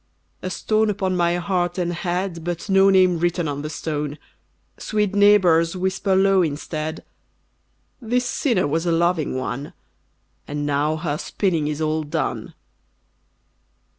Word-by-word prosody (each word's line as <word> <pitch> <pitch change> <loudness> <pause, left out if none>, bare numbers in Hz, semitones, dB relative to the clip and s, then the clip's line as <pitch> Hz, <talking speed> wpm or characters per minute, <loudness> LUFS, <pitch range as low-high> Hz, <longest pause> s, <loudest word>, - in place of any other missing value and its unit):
A 185 - -3
stone 215 +4 +1
upon 190 -2 -1
my 175 -1 +2
heart 175 0 -1
and 175 -1 -1
head, 175 0 -3
But 175 +3 -4
no 195 0 +6
name 185 -3 +4
written 175 -1 0
on 145 -1 -3
the 150 - -5
stone! 150 -2 -4 0.6
Sweet 210 -2 -1
neighbours, 190 -5 +4
whisper 190 +1 0
low 195 0 +4
instead, 155 0 -3 1.0
"This 245 +2 0
sinner 235 -6 +1
was 165 +4 -1
a - - +2
loving 165 -4 +1
one, 130 +2 -4 0.7
And 145 0 -3
now 145 +2 +1
her 155 -2 -3
spinning 170 -7 -1
is 150 +1 -3
all 155 0 0
done." 155 +1 -3
175 Hz, 135 wpm, -22 LUFS, 155-190 Hz, 1.0 s, no